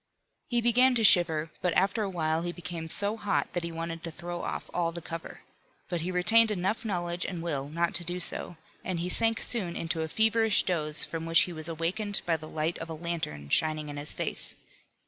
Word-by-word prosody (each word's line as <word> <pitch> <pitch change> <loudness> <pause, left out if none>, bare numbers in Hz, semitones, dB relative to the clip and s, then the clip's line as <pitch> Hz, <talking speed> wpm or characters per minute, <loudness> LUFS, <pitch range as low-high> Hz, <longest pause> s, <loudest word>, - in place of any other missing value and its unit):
He 240 -1 +1
began 250 +2 +4
to 230 - +1
shiver, 165 -5 +4
but 180 -2 0
after 195 +4 +2
a 205 - -1
while 160 -3 0
he 175 0 -2
became 175 -2 -6
so 205 +5 +1
hot 205 -2 0
that 175 - -1
he 170 - -4
wanted 165 0 -5
to 170 - -6
throw 175 +2 -6
off - - -4
all 170 -1 0
the 170 - -6
cover. 165 0 -8 0.5
But 175 -2 -2
he 175 - -3
retained 220 +6 +5
enough 205 +3 -1
knowledge 175 -4 -2
and 180 -3 -4
will 145 -4 -3
not 170 +2 0
to 175 - 0
do 175 +2 -3
so, 175 -1 -1 0.3
and 185 -2 -2
he 175 +2 -2
sank 225 +3 +5
soon 190 -8 0
into 165 0 -2
a 160 - -2
feverish 220 +3 +3
doze 155 -4 +1
from 165 0 -5
which 165 +4 +6
he 185 -4 -1
was 155 0 -4
awakened 190 +6 -1
by 170 - +2
the 155 0 -8
light 160 +2 -2
of 165 - -7
a 160 - -4
lantern 155 - -4
shining 155 - +2
in 145 - -6
his 145 +1 -4
face. - - 0
175 Hz, 220 wpm, -29 LUFS, 165-195 Hz, 0.5 s, which